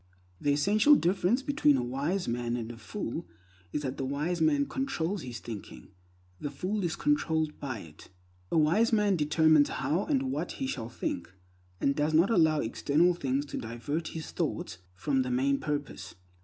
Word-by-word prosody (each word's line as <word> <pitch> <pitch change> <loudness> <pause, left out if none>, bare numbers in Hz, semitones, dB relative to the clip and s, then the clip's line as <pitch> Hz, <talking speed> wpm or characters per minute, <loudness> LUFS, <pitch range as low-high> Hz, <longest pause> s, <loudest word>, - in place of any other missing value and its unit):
The 145 - +1
essential 210 - +5
difference 195 +5 +2
between 150 - +3
a 125 - -1
wise 145 +10 -1
man 120 0 -1
and 115 -1 -5
a 120 - -10
fool 105 -5 -5 0.4
is 150 - -2
that 130 -1 -3
the - - -3
wise 150 +6 -1
man 145 -3 +3
controls 205 - -2
his 125 -4 -6
thinking, 110 -5 -9 0.5
the 145 - -3
fool 185 +9 -2
is 170 -2 -1
controlled 160 - 0
by 130 -7 -4
it. 80 -2 -14 0.4
A - - +2
wise 175 +10 +4
man 210 -3 +3
determines 155 -1 +4
how 170 +6 -1
and 270 -3 0
what - - -3
he 270 - -3
shall 120 - -4
think, 115 - -4 0.5
and 140 - +1
does 150 +1 +1
not 170 +7 +4
allow 160 -7 +4
external 155 +9 +2
things 140 -4 -1
to 140 - -6
divert 120 +8 -4
his 160 -2 -6
thought 85 - -3 0.2
from 135 +8 +1
the 130 - -2
main 135 +3 +1
purpose. 145 -9 -4
150 Hz, 175 wpm, -29 LUFS, 130-180 Hz, 0.5 s, essential